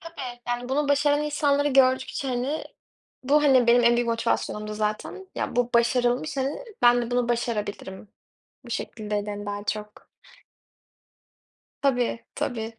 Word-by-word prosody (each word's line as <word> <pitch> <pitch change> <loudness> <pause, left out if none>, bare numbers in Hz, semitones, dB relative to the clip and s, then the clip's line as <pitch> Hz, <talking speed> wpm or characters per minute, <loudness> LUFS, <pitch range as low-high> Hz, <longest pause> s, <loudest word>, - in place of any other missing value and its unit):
Tabii. 265 -8 -8
Yani, 245 0 -2
bunu 285 +2 0
başaran 290 +1 +3
insanları 290 -1 +1
gördükçe 260 0 +2
hani, 255 +5 -2 0.6
bu, 295 +3 +4
hani, 260 -4 +5
benim 240 0 +5
en 235 - +5
büyük 240 0 0
motivasyonumdu 215 -2 -1
zaten. 215 - -3
"Ya, - - -3
bu 245 0 +1
başarılmış, 245 +4 +2
hani, 275 - -2 0.2
ben 240 0 +6
de 235 - -5
bunu 245 -1 +1
başarabilirim." 210 -4 -3 0.6
Bu 240 - -11
şekildeydi, 210 -2 -3
hani, 205 0 -6
daha 205 0 -4
çok. 210 0 -5 1.7
Tabii, 245 -4 0
tabii. 225 -2 -4
245 Hz, 135 wpm, -25 LUFS, 225-275 Hz, 1.7 s, ben